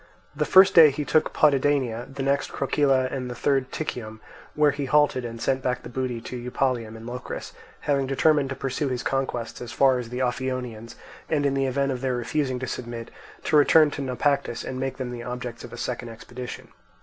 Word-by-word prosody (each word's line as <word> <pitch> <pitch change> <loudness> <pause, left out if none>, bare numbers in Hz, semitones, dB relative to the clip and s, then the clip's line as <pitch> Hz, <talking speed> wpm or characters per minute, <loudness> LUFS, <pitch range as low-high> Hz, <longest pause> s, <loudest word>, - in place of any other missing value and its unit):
The 150 +1 0
first 190 +4 +7
day 160 -3 +9
he 145 +1 -3
took 155 - +2
Potidania, 135 -5 +2
the 135 0 -4
next 140 +1 0
Krokyle, 140 +1 +1 0.2
and 125 -2 -4
the 125 - -5
third 135 0 +1
Tichium, 110 -8 -5 0.4
where 150 -1 +4
he 140 0 -3
halted 145 -2 +3
and 115 -1 -6
sent 130 +2 0
back 125 -1 -1
the - - -8
booty 130 -3 -2
to 125 - -6
Eupalium 120 -4 -1
in 110 - -11
Locris, 125 +1 -6 0.3
having 140 -2 +1
determined 140 +1 +3
to 135 - -3
pursue 135 +2 -2
his 125 -1 -3
conquests 130 -3 -2
as 120 -1 -6
far 130 0 +3
as 120 -2 -6
the 125 +2 -2
Ophionians, 125 -3 -3 0.3
and, 145 -2 +1
in 140 - +2
the 135 -1 +1
event 140 +1 0
of 125 -2 -4
their 130 -2 0
refusing 130 +2 -1
to 130 - -4
submit, 120 -2 -6 0.3
to - - +1
return 150 +1 +6
to 145 - -5
Naupactus 135 -1 0
and 130 - -5
make 135 0 -3
them 130 -2 -4
the 120 -1 -6
objects 125 -1 -6
of 120 - -9
a 120 - -8
second 120 0 -4
expedition. 120 +2 -8
130 Hz, 205 wpm, -25 LUFS, 125-140 Hz, 0.4 s, day